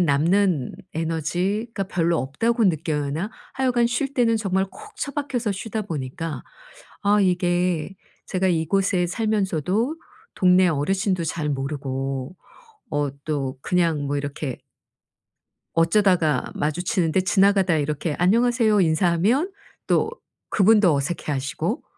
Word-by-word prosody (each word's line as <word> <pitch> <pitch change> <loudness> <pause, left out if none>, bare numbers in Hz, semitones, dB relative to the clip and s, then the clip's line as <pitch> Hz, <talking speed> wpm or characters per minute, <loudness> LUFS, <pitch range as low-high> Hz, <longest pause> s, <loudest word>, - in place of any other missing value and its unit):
남는 170 -1 +2 0.2
에너지가 180 +7 -2
별로 170 -2 0
없다고 225 - 0
느끼나? 155 +1 -1 0.2
하여간 250 -3 +2
쉴 275 +3 -2
때는 230 -3 +3
정말 190 -2 0
콕 430 0 -14
처박혀서 275 -6 -2
쉬다 220 +2 -4
보니까 150 -4 -5 0.6
아 205 +1 +4
이게 180 -1 +1 0.3
제가 190 0 0
이곳에 180 +2 +1
살면서도 210 - 0 0.4
동네 185 0 +5
어르신도 185 +4 0
잘 155 -1 -2
모르고 135 +1 -3 0.6
어 145 -1 0
또 140 -4 -2
그냥 165 -5 +1
뭐 145 - -1
이렇게 140 -2 -4 1.2
어쩌다가 165 -4 +3
마주치는데 175 +3 0
지나가다 195 -2 +3
이렇게 150 +1 -2
"안녕하세요." 225 +3 +3
인사하면 180 - +2 0.4
또 - - +2 0.4
그분도 205 -4 +5
어색해 150 +2 -2
하시고 135 0 -2
180 Hz, 265 characters per minute, -23 LUFS, 150-205 Hz, 1.2 s, 동네